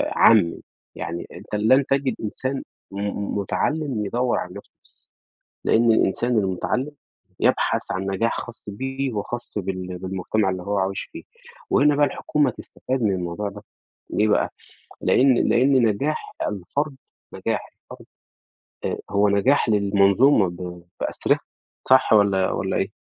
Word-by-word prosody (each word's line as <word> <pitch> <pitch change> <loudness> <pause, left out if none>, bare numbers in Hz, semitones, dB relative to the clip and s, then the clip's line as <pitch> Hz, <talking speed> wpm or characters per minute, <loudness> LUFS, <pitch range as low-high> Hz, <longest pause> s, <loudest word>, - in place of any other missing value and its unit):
عامّي، 85 - +5 0.3
يعني 85 +1 -5
أنت - - -7
لن 130 +6 +4
تجد 135 -3 0
إنسان 130 +5 -3 0.3
م 100 +1 -3
مُتعلّم 135 +2 -1
يدوّر 120 +4 0
عن 90 0 -5
نَفْسه - - -11
بس، - - -25 0.6
لإن 115 0 +4
الإنسان 115 +3 +2
المُتعلّم 105 +8 -1 0.5
يبحث - - +2
عن 95 - -2
نجاح 100 +4 0
خاص 120 -1 -10
بيه 135 +5 -3
وخاص 120 +3 -5
بال 95 -2 -4
بالمجتمع 95 +2 -1
اللي 95 -1 -4
هو 100 +1 -1
عايش 95 +1 -2
فيه، 330 - -8 0.5
وهنا 145 0 +4
بقى 145 0 +4
الحكومة 145 -3 0
تستفاد 130 +1 -5
من 105 -3 +2
الموضوع 90 +3 -3
ده، 100 +1 -10 0.5
ليه 105 +1 +2
بقى؟ - - +2 0.5
لإن 130 -1 +4
لإن 130 +4 +4
نجاح 140 +9 -2 0.2
الفرد 135 - -3 0.4
نجاح - - -2 0.3
الفرد - - -11 0.8
آآ - - -2
هو 100 +1 +3
نجاح 115 +6 +3
للمنظومة 100 +2 +4
ب 90 0 -8 0.2
بأسرِها - - 0 0.5
صح 130 -3 +5
والّا 100 -3 +4
والّا - - -1
إيه؟ - - -1
105 Hz, 135 wpm, -23 LUFS, 95-130 Hz, 0.8 s, عامّي